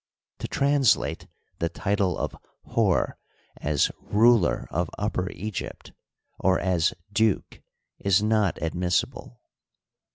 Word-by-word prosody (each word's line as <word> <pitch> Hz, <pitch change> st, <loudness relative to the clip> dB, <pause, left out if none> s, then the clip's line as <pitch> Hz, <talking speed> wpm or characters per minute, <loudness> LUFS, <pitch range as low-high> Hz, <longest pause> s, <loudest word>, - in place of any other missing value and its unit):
To -, -, -4 dB
translate 140 Hz, -4 st, +2 dB, 0.3 s
the 85 Hz, -, 0 dB
title 100 Hz, 0 st, 0 dB
of -, -, -3 dB, 0.3 s
Hor -, -, +1 dB, 0.4 s
as 75 Hz, -1 st, +1 dB
ruler 110 Hz, -3 st, +3 dB
of 85 Hz, 0 st, -1 dB
Upper 100 Hz, -3 st, -1 dB
Egypt," 105 Hz, -1 st, -6 dB, 0.5 s
or 95 Hz, 0 st, +3 dB
as 90 Hz, -3 st, +1 dB, 0.2 s
"duke," 110 Hz, -2 st, +1 dB, 0.4 s
is 100 Hz, +1 st, +3 dB
not 105 Hz, -3 st, +2 dB
admissible. 85 Hz, -7 st, -1 dB
95 Hz, 100 wpm, -26 LUFS, 85-110 Hz, 0.5 s, ruler